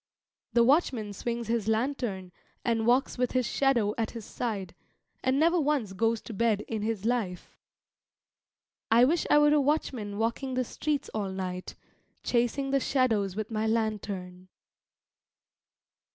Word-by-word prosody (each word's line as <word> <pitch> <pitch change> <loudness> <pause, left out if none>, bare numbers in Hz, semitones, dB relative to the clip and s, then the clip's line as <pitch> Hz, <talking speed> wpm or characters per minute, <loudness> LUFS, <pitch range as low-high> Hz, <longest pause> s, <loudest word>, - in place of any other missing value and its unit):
The 235 -1 +5
watchman 245 -6 +2
swings 235 +2 -3
his 230 -2 -1
lantern 220 -5 -1 0.3
and 225 -1 +1
walks 250 +1 +2
with 250 - 0
his 255 -1 +2
shadow 235 -7 +2
at 225 - 0
his 230 -3 -8
side, 200 -7 -4 0.5
and 260 +1 +2
never 340 +3 +4
once 280 -9 0
goes 225 +3 +1
to 230 - -8
bed 215 0 +1
in 220 0 -4
his 215 -1 -2
life. 225 -7 -2 1.3
I 235 +2 +6
wish 330 +5 +1
I - - +6
were 295 0 +5
a 300 - +4
watchman 260 -8 -1
walking 235 +4 -1
the 255 - +1
streets 295 +4 -2
all 205 -3 -2
night, 185 -1 -5 0.5
chasing 250 +3 0
the 275 - +3
shadows 225 -9 +1
with 215 +1 -4
my 220 0 0
lantern. 200 -5 -2
230 Hz, 145 wpm, -28 LUFS, 210-260 Hz, 1.3 s, I